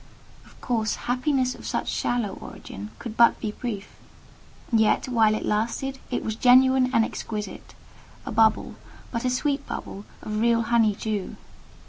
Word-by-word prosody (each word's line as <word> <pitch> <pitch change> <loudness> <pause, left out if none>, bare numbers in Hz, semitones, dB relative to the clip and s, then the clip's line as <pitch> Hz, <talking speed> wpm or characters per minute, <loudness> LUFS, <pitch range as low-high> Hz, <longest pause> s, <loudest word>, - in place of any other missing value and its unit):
Of - - -20
course, 225 -3 0
happiness 255 +1 +1
of - - -10
such - - -2
shallow 240 -4 0
origin 100 +2 -9
could 235 - -6
be - - -12
but 225 -2 +3
brief; 210 -5 -4 0.8
yet, 220 +2 +3
while 225 -4 +3
it - - -3
lasted 235 +5 -1
it 245 - -2
was 220 - -2
genuine 255 +2 +5
and 230 -3 +4
exquisite: 210 -2 -6 0.5
a - - -4
bubble—but 225 +2 0
a - - +3
sweet 275 +2 -1
bubble—of 210 +1 -6
real 230 0 +3
honey 225 -3 +3
dew. 210 -2 -3
230 Hz, 140 wpm, -25 LUFS, 215-255 Hz, 0.8 s, genuine